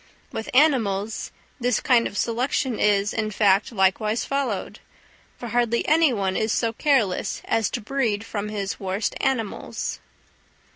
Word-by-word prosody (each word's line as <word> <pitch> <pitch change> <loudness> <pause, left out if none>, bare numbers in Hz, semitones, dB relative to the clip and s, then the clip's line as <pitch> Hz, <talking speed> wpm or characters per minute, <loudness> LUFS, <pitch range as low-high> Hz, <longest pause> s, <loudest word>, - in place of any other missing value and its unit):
With 225 - -5
animals 225 -8 +2 0.3
this 245 -2 +1
kind 245 -4 +3
of 205 - -8
selection 245 +1 0
is, 205 0 +2
in 215 -1 -1
fact, 200 0 +2
likewise 210 +2 +1
followed; 275 -8 -2 0.6
for 240 - -7
hardly 235 0 +1
any 320 -2 +4
one 195 -5 -1
is 220 0 0
so 230 0 0
careless 230 -9 +1
as 225 -1 +1
to - - -4
breed 225 -3 -1
from 210 -1 -4
his 200 -2 -4
worst 195 +2 -2
animals. 230 -6 -2
225 Hz, 140 wpm, -24 LUFS, 205-245 Hz, 0.6 s, any